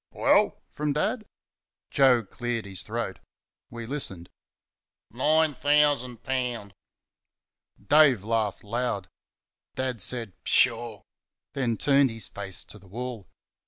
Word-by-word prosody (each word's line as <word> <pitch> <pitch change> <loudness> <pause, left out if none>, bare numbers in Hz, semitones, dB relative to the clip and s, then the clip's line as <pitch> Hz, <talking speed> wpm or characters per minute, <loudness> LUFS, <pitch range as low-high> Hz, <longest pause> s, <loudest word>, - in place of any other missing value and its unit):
"Well?" - - +3
from 150 -1 -1
Dad. 215 - -1 0.7
Joe 130 -4 +5
cleared 120 +2 -3
his 95 -3 -4
throat. - - -4 0.5
We 115 -1 -7
listened. 105 -10 -3 0.8
"Nine 155 +5 +3
thousan' 145 -4 +2
poun'." 120 -5 -3 1.1
Dave 145 -9 +6
laughed 110 -3 -1
loud. 115 -3 -2 0.7
Dad 130 -4 -2
said, 115 -2 -2
"Pshaw!" 115 -3 +1 0.5
and 120 -4 -1
turned 140 -1 +5
his 115 -1 -5
face 95 -2 -4
to 105 - -11
the 95 - -19
wall. 120 0 -6
120 Hz, 110 wpm, -27 LUFS, 110-135 Hz, 1.1 s, Dave